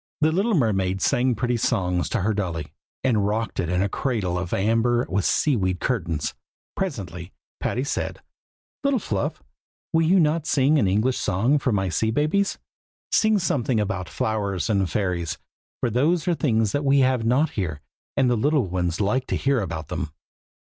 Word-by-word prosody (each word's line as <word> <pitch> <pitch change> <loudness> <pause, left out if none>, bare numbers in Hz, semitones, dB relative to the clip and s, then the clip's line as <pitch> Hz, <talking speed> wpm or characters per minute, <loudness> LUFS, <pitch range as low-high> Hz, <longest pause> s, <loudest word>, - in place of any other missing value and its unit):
The 155 +1 +4
little 200 +6 +1
mermaid 95 - +1
sang 125 +4 +2
pretty 120 +2 0
songs 90 -5 0
to 120 - -1
her 105 +4 +1
dolly, 85 -7 -3 0.3
and 110 -6 +2
rocked 110 +2 -2
it 85 - -1
in 90 +1 +1
a - - +1
cradle 100 -5 -1
of 90 -1 -3
amber 115 +4 +2
with 95 +2 0
sea 145 -3 +2
weed 95 -4 0
curtains. 85 - -1 0.4
Presently 95 - -4 0.3
Patty 125 - -1
said, 140 - -3 0.6
"Little 280 -1 +2
Fluff, 100 - -3 0.5
will 165 - +4
you 175 +4 +4
not 155 -1 +1
sing 145 +2 +3
an 105 - +2
English 110 +7 +1
song 120 +11 +2
for 130 - 0
my 95 -3 +1
sea 110 +6 0
babies? 155 - +1 0.5
sing 220 -1 +4
something 130 - 0
about 100 -3 -2
flowers 100 -5 -1
and 95 -3 +1
fairies, 90 -5 -1 0.4
for 120 - +1
those 155 +8 +1
are 175 - +3
things 115 -10 +1
that 145 - -1
we 140 0 +4
have 130 -2 +2
not 130 +7 +2
here, 80 -8 -3 0.4
and 135 - +4
the 125 - +3
little 140 +2 +2
ones 90 -2 -2
like 125 +6 0
to - - -1
hear 135 -3 +1
about 80 -5 -5
them." 75 - -3
110 Hz, 175 wpm, -24 LUFS, 95-135 Hz, 0.6 s, The